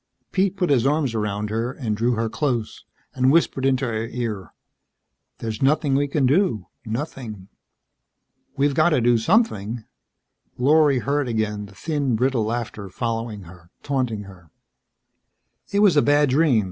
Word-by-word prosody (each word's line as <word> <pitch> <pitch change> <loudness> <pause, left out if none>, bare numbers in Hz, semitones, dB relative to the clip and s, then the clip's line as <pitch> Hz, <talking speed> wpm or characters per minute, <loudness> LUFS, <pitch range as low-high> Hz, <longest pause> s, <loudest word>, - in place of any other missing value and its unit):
Pete 195 0 +1
put 180 -5 +1
his 130 -2 +3
arms 145 -4 +1
around 105 -1 -2
her 115 +3 -1
and 120 -6 -3
drew 120 +3 +1
her 115 0 -1
close 120 -3 -2 0.3
and 130 0 +3
whispered 140 -4 +2
into 135 0 +1
her 115 -1 -2
ear. 115 -6 -4 0.9
"There's 110 -2 -5
nothing 140 +1 +2
we 140 +1 +2
can 140 -1 +1
do 140 - +2 0.2
nothing." 110 - -5 1.1
"We've 140 +1 +2
got 155 +4 +4
to 150 - +2
do 120 0 +3
something." 115 - +1 0.7
Lorry 145 +1 +4
heard 140 +2 0
again 105 -3 -2
the 100 - -17
thin, 145 -1 -1
brittle 125 -1 +1
laughter 110 -3 -4
following 115 0 -3
her, 85 -1 -15
taunting 125 -7 -1
her. 90 -4 -15 1.2
"It 200 0 +2
was 200 -6 +5
a 145 - +6
bad 145 -1 +3
dream. 140 -4 +4
125 Hz, 150 wpm, -23 LUFS, 110-145 Hz, 1.2 s, a